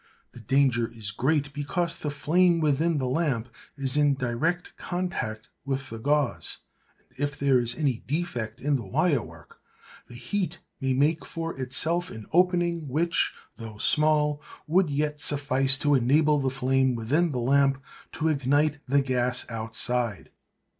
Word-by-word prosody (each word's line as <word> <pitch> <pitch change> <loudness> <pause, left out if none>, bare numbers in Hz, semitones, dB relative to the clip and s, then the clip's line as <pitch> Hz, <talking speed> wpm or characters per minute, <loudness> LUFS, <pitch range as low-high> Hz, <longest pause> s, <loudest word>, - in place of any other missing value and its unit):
The - - -12
danger 125 -1 +2
is 110 -4 -3
great 140 +6 0
because 165 +4 -1
the 150 - -4
flame 170 +4 +2
within 155 +2 +1
the 130 - -1
lamp 130 -4 -1 0.3
is 135 0 0
in 145 -1 +3
direct 140 +8 -2
contact 145 -12 -4
with 135 -2 -4
the 115 - -6
gauze, 145 +2 0 0.4
and - - -36
if 145 0 -2
there 140 -3 +3
is 120 -1 0
any 140 -7 0
defect 125 -8 -3
in 145 0 +1
the 120 - -6
wire 140 - +1
work, 80 -4 -14 0.5
the 120 - -12
heat 175 +8 -3 0.2
may 135 -2 0
make 150 +5 +1
for 165 0 -5
itself 160 +7 0
an 110 -2 -9
opening 175 -2 +2
which—though 135 -7 -2
small—would 150 - +1
yet 150 +1 -1
suffice 135 -2 +3
to 145 +1 +2
enable 145 +4 +3
the 135 -1 0
flame 130 0 +1
within 145 +10 +1
the 135 - -3
lamp 135 +2 +2 0.3
to 160 - -1
ignite 145 0 +1
the 140 +1 +3
gas 125 -1 0
outside. 115 0 -1
140 Hz, 145 wpm, -26 LUFS, 125-155 Hz, 0.5 s, in